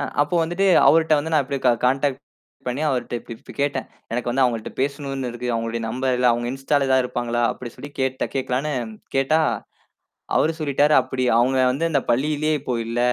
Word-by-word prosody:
ஆ, 140 - -1 0.2
அப்போ 145 +4 -3
வந்துட்டு, 175 +4 0 0.2
அவருட்ட 160 -1 +5
வந்து 160 +2 -3
நான் 150 -2 +4
அப்படியே 135 0 -4
க 125 - +7 0.2
காண்டாக்ட் 135 +1 0 0.5
பண்ணி 130 +5 -2
அவருட்ட 125 -3 -2
இப்டி 115 - -11
இப்டீ - - -13
கேட்டேன். 140 -2 -1 0.3
"எனக்கு 120 0 -1
வந்து 130 +2 +2
அவங்கள்ட்ட 115 -3 -1
பேசணும்ன்னு 135 -2 -2
இருக்கு. 120 +1 -6
அவங்களுடைய 115 0 -2
நம்பர் 130 +3 0
இல்ல. 125 0 +2
அவுங்க 120 0 -2
இன்ஸ்ட்டால, 135 +1 0
ஏதாவது 130 -1 +3
இருப்பாங்களா?" 120 -1 -2
அப்படி 120 -2 -8
சொல்லிக் 145 0 -11
கேட்ட 130 0 0
கேட்கலான்னு 135 +3 -1 0.4
கேட்டா, 135 +4 +3 1.0
அவரு 160 - +3
சொல்லிட்டாரு, 145 0 +2
அப்படி, 130 0 -3
"அவுங்க 130 +2 +3
வந்து 165 +6 0
அந்தப் 140 -6 -1
பள்ளியிலயே 150 +5 +1
இப்போ 130 -2 -3
இல்ல. 115 +1 -2
135 Hz, 185 wpm, -22 LUFS, 125-145 Hz, 1.0 s, க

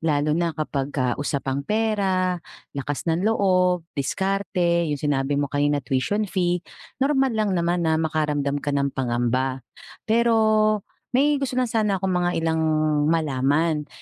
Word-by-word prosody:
Lalo 150 -2 +1
na 170 0 0
kapag 145 -2 -3
ka 130 -1 +1
usapang 140 -1 -2
pera, 190 -2 0 0.3
lakas 140 0 -4
ng 165 +2 +1
loob, 185 -5 +2
diskarte, 175 +1 0
yung 145 -2 -2
sinabi 140 -1 0
mo 145 - -1
kanina, 145 +1 +1
tuition 135 +12 0
fee. 180 -2 0 0.4
Normal 270 -3 +2
lang 215 -2 +1
naman 175 +1 0
na 160 -1 +2
makaramdam 150 -3 -1
ka 145 - -2
ng 140 -1 0
pangamba. 130 +1 -1 0.4
Pero 220 -2 +3 0.3
may 285 +1 +3
gusto 255 -2 -2
lang 255 - +3
sana 215 -4 0
akong 190 0 -1
mga 175 0 0
ilang 160 0 0 0.5
malaman. 150 0 +1
165 Hz, 140 wpm, -23 LUFS, 145-200 Hz, 0.5 s, Pero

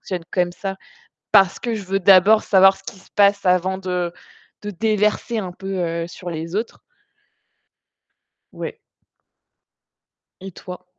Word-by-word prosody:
fonctionne 180 -3 -5
comme 180 -1 +1
ça, 195 +1 -5 0.6
parce 195 -2 +4
que 235 -2 -3
je 210 - -6
veux 195 +1 -1
d'abord 195 +3 +5
savoir 195 -1 +5
ce 190 - -21
qui 195 - -9
se - - -23
passe 200 -1 +3
avant 185 +1 +2
de 180 -2 -3 0.5
de 210 - -5
déverser, 215 +3 0
heu, - - -4
un 180 - -6
peu 175 -3 -4
sur 175 0 -9
les 165 +3 -6
autres. 225 +2 -4 1.7
Ouais. - - -7 1.6
Et 195 - -8
toi? 180 +1 -10
190 Hz, 140 wpm, -20 LUFS, 180-200 Hz, 1.7 s, d'abord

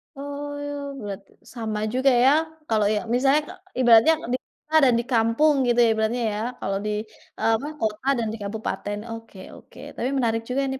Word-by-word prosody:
Oh, 285 0 -6
bulat, 200 -2 -6 0.2
sama 220 -3 -5
juga 260 +2 +3
ya, 250 +3 +5 0.4
kalau, 215 -2 +2
ya 210 - 0
misalnya 275 +4 +3
k - - -11 0.3
ibaratnya, 240 +7 +7 0.2
di - - +2
kota 315 +1 -9
dan 250 - +5
di - - -1
kampung 230 +7 +3
gitu, 240 0 +2
ya, 230 - +4
ibaratnya, 220 +2 0
ya. 210 - -3 0.2
Kalau 195 0 -2
di, - - -1 0.5
eee, 225 - +3
apa, 285 - -6
kota 215 +4 -2
dan 230 -2 -1
di - - -5
kabupaten, 205 0 -4
oke 225 -4 -9 0.2
oke, - - -16 0.2
tapi 250 - -1
menarik 225 -2 +1
juga 270 +2 0
nih, 265 - -4
235 Hz, 185 wpm, -24 LUFS, 220-275 Hz, 0.5 s, ibaratnya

